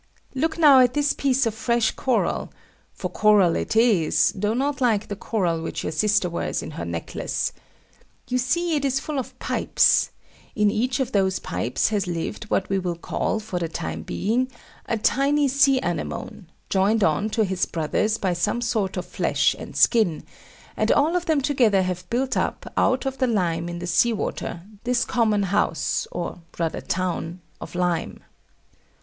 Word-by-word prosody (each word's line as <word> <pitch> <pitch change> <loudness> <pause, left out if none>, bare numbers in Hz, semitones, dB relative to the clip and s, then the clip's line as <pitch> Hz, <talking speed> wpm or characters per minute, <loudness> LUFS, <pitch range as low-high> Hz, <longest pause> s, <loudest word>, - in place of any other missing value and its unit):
Look 315 +5 -1
now 290 -5 +7
at 250 0 +4
this 290 0 +2
piece 270 -1 +1
of 225 - 0
fresh 235 0 +1
coral 255 -3 -1 0.4
for - - -5
coral 205 -5 +4
it - - -2
is, 220 -9 +3
though 210 +3 -1
not 275 +2 -1
like 220 -4 +1
the 205 - -3
coral 180 -6 -1
which 165 - -4
your - - -2
sister 205 +3 +2
wears 170 - -3
in - - -7
her - - -5
necklace. - - -3 0.7
You 250 0 0
see 330 +7 0
it 290 - -1
is 270 -1 +1
full 290 0 -3
of 255 - -7
pipes; - - +2 0.5
in 210 -1 +3
each 250 +4 0
of 265 -1 -1
those 190 -3 +1
pipes 110 - -1
has 205 -4 -1
lived 170 +6 -4
what 195 -2 0
we 195 0 0
will 180 -2 -2
call, 170 +5 -2
for 210 -4 -4
the 170 - -2
time 80 - -4
being, 235 - -1 0.4
a 230 - 0
tiny 280 +6 +2
sea 275 0 +4
anemone, - - -4 0.2
joined 200 +3 +2
on 165 +7 +1
to 220 +1 +1
his 190 -2 -1
brothers 190 +7 0
by 185 -4 0
some 205 +7 0
sort 220 -6 -1
of 180 - -3
flesh - - +1
and - - -9
skin; 215 -10 +3 0.5
and - - +1
all 315 +5 +3
of 355 -1 -1
them 310 -3 +2
together 240 -9 +3
have 180 -1 -4
built 260 +2 0
up, - - -2
out 260 +1 +2
of 270 0 -3
the 260 - +2
lime 175 -6 0
in 175 - -5
the 175 - -5
sea 230 +7 +3
water, 170 -4 -4 0.2
this 245 0 +1
common 215 -4 +1
house, 185 -4 0
or 175 0 -5 0.2
rather 165 -2 -2
town, 180 -1 -3 0.2
of - - -8
lime. 175 -1 -1
215 Hz, 180 wpm, -23 LUFS, 180-255 Hz, 0.7 s, now